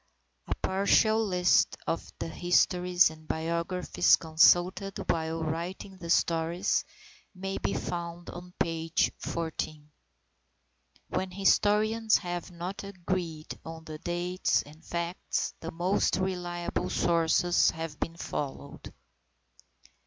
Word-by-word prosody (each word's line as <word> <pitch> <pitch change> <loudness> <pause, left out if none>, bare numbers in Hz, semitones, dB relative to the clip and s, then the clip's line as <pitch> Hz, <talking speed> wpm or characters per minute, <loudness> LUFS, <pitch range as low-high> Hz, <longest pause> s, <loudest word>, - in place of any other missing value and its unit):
A - - -1
partial 215 +3 +3
list 180 -3 +3
of 165 - -3
the - - -4
histories 180 +1 +3
and 155 0 -14
biographies 170 +3 +2
consulted 175 +4 +3
while 160 0 -2
writing 175 +4 -4
the 170 -1 -7
stories, 170 +2 +2 0.5
may 195 +1 -4
be - - -1
found 170 0 -4
on 180 0 -9
page 165 0 +1
xiv. 160 -2 -3 1.3
When 190 - -1
historians 210 +3 +3
have 175 -2 -5
not 180 +3 -6
agreed 180 -5 -4
as 160 0 -8
to 155 -1 -7
dates 175 +2 0
and 155 +3 -16
facts, 170 +1 -2
the 165 - -5
most 180 +4 +1
reliable 175 -2 -2
sources 170 +1 +3
have 160 -2 -5
been 165 0 -3
followed. 140 -2 -5
175 Hz, 110 wpm, -29 LUFS, 165-185 Hz, 1.3 s, partial